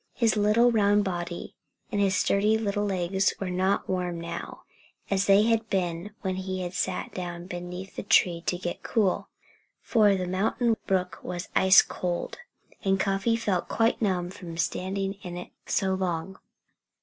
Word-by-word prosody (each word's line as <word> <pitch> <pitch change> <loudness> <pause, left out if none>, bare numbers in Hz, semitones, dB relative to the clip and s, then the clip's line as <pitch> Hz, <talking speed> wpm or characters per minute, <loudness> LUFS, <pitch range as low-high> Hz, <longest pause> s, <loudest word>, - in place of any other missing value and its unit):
His 230 -3 +2
little 215 +4 +4
round 205 -2 +3
body 175 -2 -4 0.4
and 205 -2 0
his 195 -1 +2
sturdy 210 +3 +3
little 205 -1 -1
legs 190 0 +1
were 190 -2 -3
not 185 +2 +1
warm 180 -2 -2
now, 170 0 -6 0.5
as 195 0 +2
they 200 +1 +6
had 225 0 +1
been 175 0 -1
when 190 -2 -2
he 185 -1 -3
sat - - -2
down 175 -1 -5
beneath 180 +1 -7
the - - -2
tree 175 -3 +3
to 180 - +1
get 175 -1 -5
cool. 205 -5 0 0.5
For 210 -4 +3
the 185 -1 -2
mountain 220 +6 +1
brook 185 -1 0
was 175 +1 -5
ice 190 0 +7
cold; 175 - -4 0.4
and 195 -1 +2
Cuffy 195 +4 +1
felt 205 -6 -1
quite 225 +1 +1
numb 180 -4 0
from 170 -3 -9
standing 195 +4 -2
in 175 -1 -6
it 180 - -8 0.2
so 190 -1 +1
long. 185 0 -3
190 Hz, 160 wpm, -27 LUFS, 180-205 Hz, 0.5 s, ice